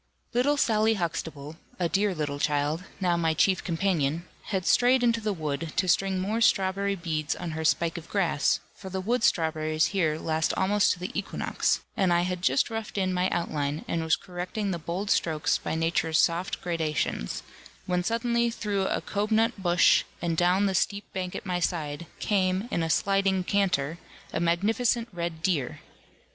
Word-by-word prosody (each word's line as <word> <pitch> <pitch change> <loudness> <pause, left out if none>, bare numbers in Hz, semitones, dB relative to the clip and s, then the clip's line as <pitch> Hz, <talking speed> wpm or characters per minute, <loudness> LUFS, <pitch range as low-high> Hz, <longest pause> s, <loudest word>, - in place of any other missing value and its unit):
Little 270 +5 +2
Sally 220 -3 +3
Huxtable, 160 -4 -4 0.2
a 175 - +1
dear 195 +2 +1
little 145 -2 -3
child, 150 +4 0
now 180 -3 +2
my 165 -2 +1
chief 190 +3 +2
companion, 165 -3 0 0.2
had 190 -4 -2
strayed 250 +1 +4
into 230 -1 +2
the 210 -1 -1
wood 155 -3 -3
to 185 - +1
string 190 +2 +2
more 210 +5 -1
strawberry 200 -1 +2
beads 160 -4 -2
on 175 -2 -5
her 160 0 -4
spike 170 +2 +1
of 160 - -15
grass, 195 -7 +1
for 190 - -10
the 190 0 -3
wood 230 +5 0
strawberries 155 -3 +2
here 160 -6 +1
last 160 0 0
almost 200 +2 +3
to 180 - -10
the 180 - -4
equinox; 205 - -1
and 190 -3 +2
I 175 0 +4
had 180 0 -2
just 135 - +2
roughed 225 -2 -5
in 185 -1 +1
my 180 +1 +1
outline, 150 -3 -2
and 165 - -1
was 160 0 +3
correcting 185 +3 -4
the 170 - -3
bold 180 +5 -3
strokes, 155 -2 +1
by - - -3
nature's 165 0 +1
soft 170 +3 +1
gradations; 160 - -2 0.4
when 180 0 0
suddenly 235 +2 +1
through 205 -4 -1
a - - -1
cobnut 220 +1 0
bush, 175 -1 +4 0.2
and 170 -1 -1
down 180 +4 +3
the 195 - +1
steep 200 +2 0
bank 185 -2 -4
at - - -6
my 180 -2 -1
side, 160 -2 -2
came, 190 0 0
in 170 - 0
a 165 - -1
sliding 195 +1 +2
canter, 180 -6 0 0.3
a - - 0
magnificent 220 +8 +1
red 170 -2 -4
deer. 155 -9 0
180 Hz, 175 wpm, -27 LUFS, 160-200 Hz, 0.4 s, strayed